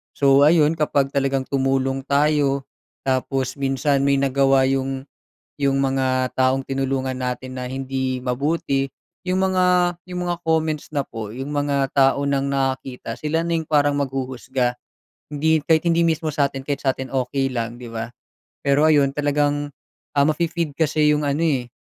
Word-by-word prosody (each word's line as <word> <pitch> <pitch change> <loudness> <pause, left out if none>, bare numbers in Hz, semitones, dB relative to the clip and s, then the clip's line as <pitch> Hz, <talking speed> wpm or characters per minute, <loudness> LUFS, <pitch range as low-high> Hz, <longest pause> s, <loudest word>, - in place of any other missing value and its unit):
So 140 0 +5
ayun 155 0 +4
kapag 145 -3 +1
talagang 135 -1 0
tumulong 135 0 0
tayo, 140 -1 +2 0.4
tapos 130 0 -1
minsan 135 0 +1
may 140 0 +3
nagawa 135 0 +3
'yong 135 0 -2 0.6
'yong 135 -1 +2
mga 130 -1 0
taong 130 +1 +2
tinulungan 135 -1 -1
natin 130 0 -4
na - - -4
hindi 130 -1 -2
mabuti 135 +1 0 0.4
'yong 185 +1 +1
mga 185 -1 +2 0.4
'yong 180 0 -4
mga 175 - -1
comments 160 -2 0
na 145 - +1
po, 110 -2 -7
'yong 135 +3 -5
mga 145 -2 0
tao 135 0 +4
nang 140 -1 +1
nakakita 130 -3 -2
sila 155 +2 0
na 170 - -1
'yong 160 - -3
parang 145 -2 +3
maghuhusga. 130 -2 -2 0.6
Hindi 160 +2 +2
kahit 160 -1 +4
hindi 170 0 +3
mismo 160 -1 0
sa'tin 140 -2 0
kahit 145 -1 -2
sa 130 - +3
atin 130 0 -6
okey 135 +1 0
lang 115 -1 -3
'di 120 - -8
ba. 115 0 -4 0.6
Pero 140 +1 +4
ayon 145 -3 +4
talagang 145 0 0 0.5
ah, 140 - +5
mafe-feed 160 0 -1
kasi 155 -1 +2
'yong 150 - -1
ano 140 +1 0
eh, 135 -6 0
135 Hz, 155 wpm, -22 LUFS, 130-150 Hz, 0.6 s, So